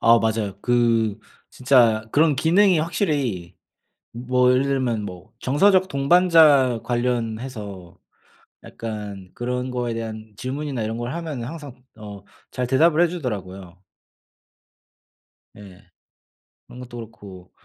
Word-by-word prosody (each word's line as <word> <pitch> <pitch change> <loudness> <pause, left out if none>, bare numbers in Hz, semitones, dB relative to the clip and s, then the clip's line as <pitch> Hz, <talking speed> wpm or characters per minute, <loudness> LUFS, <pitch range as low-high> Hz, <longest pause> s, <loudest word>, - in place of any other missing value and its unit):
아 115 0 +6
맞아요. 110 -3 -2
그 115 -3 +1 0.3
진짜 120 -4 +3
그런 155 0 +3
기능이 180 +4 +3
확실히 140 - -2 0.6
뭐 125 +1 +1
예를 125 +1 +3
들면 130 -6 -1
뭐 90 -3 -10
정서적 185 +7 +3
동반자 145 -5 +4
관련해서 115 -6 -4 0.7
약간 105 -4 -7
그런 125 +1 -3
거에 120 -2 -3
대한 110 -1 -7
질문이나 135 -1 -4
이런 110 +1 -3
걸 120 +1 -4
하면은 155 -8 -5
항상 145 -5 -9
어 100 -2 -10 0.3
잘 125 -1 -3
대답을 155 +6 +3
해 175 - +4
주더라고요. 95 - -6 1.7
예. 100 -2 -14 0.8
그런 125 - -12
것도 120 -1 -10
그렇고 100 -5 -12
120 Hz, 240 characters per minute, -22 LUFS, 110-140 Hz, 1.7 s, 아